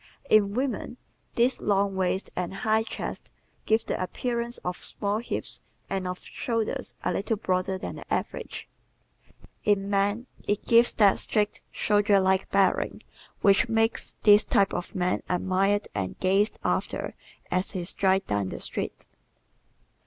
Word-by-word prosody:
In 205 -1 +5
women 250 -2 -2 0.4
this 245 +2 +2
long 200 -1 +1
waist 190 +1 -1
and 180 -1 -2
high 220 +2 +2
chest 225 - -6 0.4
give 220 +1 +2
the - - -2
appearance 235 +5 -2
of 180 0 -2
small 205 +1 -2
hips 235 - -4 0.3
and 190 -1 -1
of 180 0 -5
shoulders 230 -3 -3
a - - 0
little 215 +2 -1
broader 190 -1 0
than - - -6
the - - -12
average; - - -3 1.0
in 200 -1 +1
men 205 +4 +1 0.2
it 205 0 0
gives 235 +1 +5
that 200 -3 +5
straight, 210 -1 +1
soldier 205 -1 +3
like 190 0 +2
bearing 195 -1 +1 0.4
which 200 +5 +4
makes 225 0 +1
this 210 0 +7
type 195 -1 +2
of 175 - -4
man 180 -1 0
admired 190 +3 +1
and 95 -2 -3
gazed 195 +3 +2
after - - -1 0.4
as 185 +1 +1
he 185 -3 -3
strides 190 +2 +1
down 100 -2 -1
the - - -6
street. - - -3
200 Hz, 145 wpm, -27 LUFS, 190-220 Hz, 1.0 s, this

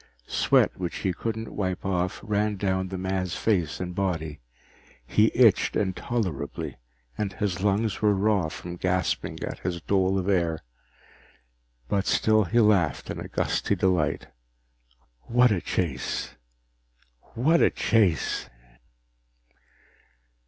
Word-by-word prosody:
Sweat - - +3
which 90 -2 -3
he 95 - +2
couldn't 110 +3 -4
wipe 95 -2 -3
off 90 -1 -1
ran 105 0 0
down 95 -1 -1
the 95 0 -5
man's 95 -1 -2
face 90 -8 0
and 90 -1 -4
body. 85 -6 -2 0.7
He 105 - +3
itched 115 -5 +4
intolerably, 95 - -2 0.4
and 100 -2 -1
his 95 -4 -2
lungs 105 +2 0
were 105 -2 +4
raw 100 -4 +1
from 85 +2 -7
gasping 90 +1 -1
at - - -5
his 90 -1 -3
dole 95 +2 +1
of 95 0 -2
air. 85 -5 +1 1.2
But 100 +8 0
still 110 -1 +3
he 115 +7 +2
laughed 100 -8 +2
in - - -5
gusty - - 0
delight. 90 -5 +1 1.0
What 125 0 +4
a 95 -5 +1
chase! 80 -9 -2 1.0
What 155 +8 +3
a - - +6
chase! 105 -8 +1
95 Hz, 120 wpm, -26 LUFS, 90-105 Hz, 1.2 s, a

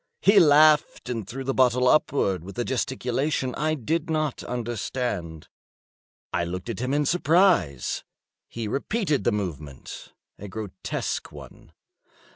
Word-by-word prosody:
He 200 0 +7
laughed 150 -5 +5
and 115 -5 -3
threw 135 +5 -6
the 135 +1 -1
bottle 125 -1 +3
upwards 100 - +2
with 100 +5 -10
a 120 - -1
gesticulation 130 +1 -1
I 155 +1 0
did 160 +5 -2
not 155 -3 -1
understand. 115 -8 -4 0.9
I 85 - +1
looked 90 +5 -5
at 110 - -6
him 130 +2 -2
in 145 +1 +1
surprise. 165 - +2 0.5
He 115 -2 -5
repeated 150 - -1
the 120 - +3
movement—a 85 - -7
grotesque 100 -2 -4
one. - - -13
125 Hz, 125 wpm, -25 LUFS, 100-150 Hz, 0.9 s, He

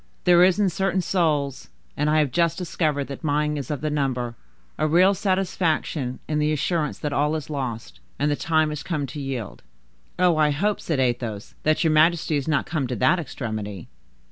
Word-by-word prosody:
There 175 -1 +6
is 185 0 +4
in 200 -3 +3
certain 190 +1 0
souls,—and 150 -3 -1
I 155 - +3
have 150 -4 +2
just 170 +2 +1
discovered 155 -5 -1
that 140 +2 -8
mine 150 0 +1
is 140 -4 -5
of 150 -3 -3
the 155 0 -1
number,—a 120 - -3
real 180 +5 +5
satisfaction 180 -8 -1
in 150 -1 0
the 150 0 +1
assurance 155 +1 -1
that 145 -1 -3
all 150 +2 +1
is 155 -1 -5
lost, 130 -5 -5 0.2
and 145 +1 +1
the - - +2
time 155 0 +1
is 150 -1 -4
come 150 -4 -2
to 145 +3 -7
yield." 130 -6 -5 0.6
"Oh, 180 -3 +3
I 155 -1 +4
hope," 200 +9 0
said 160 -5 -1
Athos, 120 -4 -2
"that 155 +3 +2
your 160 -2 +3
majesty 160 0 +3
is 140 0 -2
not 150 -2 +1
come 150 -6 -2
to 125 - -3
that 130 +10 +3
extremity." 110 - -5
150 Hz, 190 wpm, -24 LUFS, 135-165 Hz, 0.6 s, There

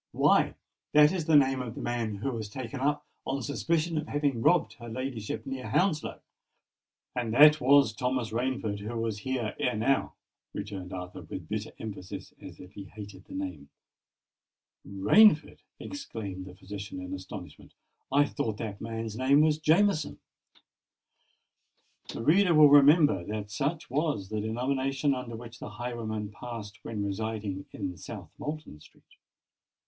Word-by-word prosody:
"Why, - - +3 0.4
that 150 0 +7
is 180 -4 -2
the 160 -1 +4
name 135 -2 +4
of 120 -2 -6
the - - -6
man 115 -3 -2
who 110 +7 -2
was 110 -4 -5
taken 130 +4 -6
up 145 +2 0 0.2
on 135 -1 -2
suspicion 160 +4 0
of 155 - -5
having 145 -5 0
robbed 175 +6 +3
her 120 -1 -8
ladyship 115 -3 -4
near 135 -1 -5
Hounslow!" 180 -6 0 0.9
"And 120 -3 -1
that 150 +2 +8
was 135 -3 +5
Thomas 125 -2 -1
Rainford 115 -3 -1
who 110 +3 -5
was 115 -2 -2
here 125 -3 -2
ere 125 - +1
now!" 130 +5 +1 0.4
returned 100 -3 -5
Arthur, 90 -1 -6
with - - -8
bitter - - -3
emphasis, 100 -4 -7
as - - -11
if 90 +2 -12
he 100 - -8
hated 100 -2 -11
the - - -10
name. 90 -7 -5 1.1
"Rainford!" 150 - +4 0.2
repeated 100 - -6
the 90 -1 -11
physician, 100 0 -7
in 90 0 -6
astonishment. 95 0 -9 0.4
"I 145 +2 +5
thought 115 -7 -3
that 105 -3 -5
man's 115 -1 -4
name 135 +4 +4
was 155 0 +3
Jameson?" 160 +1 +2 1.9
The - - -5
reader 175 +4 +5
will 150 -1 +8
remember 145 - +6
that 105 0 -5
such 150 +7 -2
was 140 - -1
the 110 -1 -2
denomination 135 +5 0
under 125 -3 -5
which 115 0 -10
the - - -7
highwayman 110 -2 -4
passed 110 -1 -8
when 105 -3 -4
residing 100 -1 -3
in 90 -1 -4
South 95 -3 -9
Moulton 150 - -6
Street. - - -20
115 Hz, 150 wpm, -29 LUFS, 105-145 Hz, 1.9 s, that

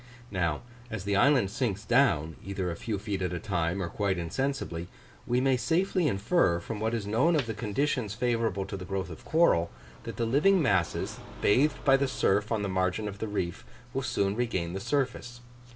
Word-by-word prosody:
Now, 85 -4 -1 0.3
as 110 -4 -4
the 100 0 0
island 120 -3 +4
sinks 105 -3 -2
down, 85 - +3
either 95 -2 -3
a - - -4
few 105 +4 -3
feet 100 -1 -3
at 90 -1 -1
a 90 - -2
time 90 -1 -1
or - - -2
quite 95 +2 -1
insensibly, 85 -2 -2 0.4
we 120 +1 +2
may 130 0 +3
safely 175 +4 +1
infer, 100 - +2
from 105 +5 -6
what 110 +2 0
is 110 -3 -3
known 125 +11 +3
of 145 -5 +1
the 115 - -3
conditions 115 0 -1
favourable 115 -4 0
to 100 - -6
the 95 - -6
growth 95 -1 -3
of 80 - -10
coral, 155 - +3 0.4
that - - -5
the 115 - 0
living 150 +11 +4
masses, 95 - 0 0.2
bathed 135 - +2
by 135 -1 +6
the 140 0 +1
surf 105 -3 +1
on 110 -2 0
the - - -1
margin 95 +2 0
of 100 0 -7
the 110 - -2
reef, 95 -3 -3 0.3
will 135 - -1
soon 100 -6 0
regain 95 -8 -1
the 95 - -3
surface. 120 +1 -2
105 Hz, 200 wpm, -29 LUFS, 95-125 Hz, 0.4 s, by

